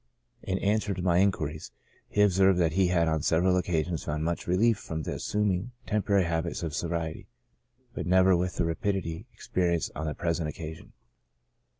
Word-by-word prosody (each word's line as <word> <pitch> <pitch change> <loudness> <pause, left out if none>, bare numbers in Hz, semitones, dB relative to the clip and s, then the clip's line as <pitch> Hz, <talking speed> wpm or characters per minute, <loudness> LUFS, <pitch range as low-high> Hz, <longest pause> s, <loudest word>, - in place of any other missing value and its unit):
In 95 - -2
answer 100 0 0
to 90 - -4
my 90 -1 +3
inquiries, 80 -6 0 0.4
he 105 - +3
observed 95 -1 +4
he 95 +1 +3
had 85 -2 +2
on 80 -1 +1
several 90 +4 +2
occasions 85 -2 -1
found 75 +1 -2
much 85 +1 -2
relief 100 +4 +3
from 80 -1 -5
assuming 105 +5 -1
temporary 100 -2 +2
habits 85 0 -2
of 80 -3 -3
sobriety, 85 0 -3 0.7
but - - -4
never 95 +1 +5
with 90 +1 -1
the - - 0
rapidity 85 0 -2
experienced 85 -2 -1
on 80 +1 -4
the 75 - -3
present 85 -2 -1
occasion. 80 +1 -8
90 Hz, 160 wpm, -28 LUFS, 80-95 Hz, 0.7 s, never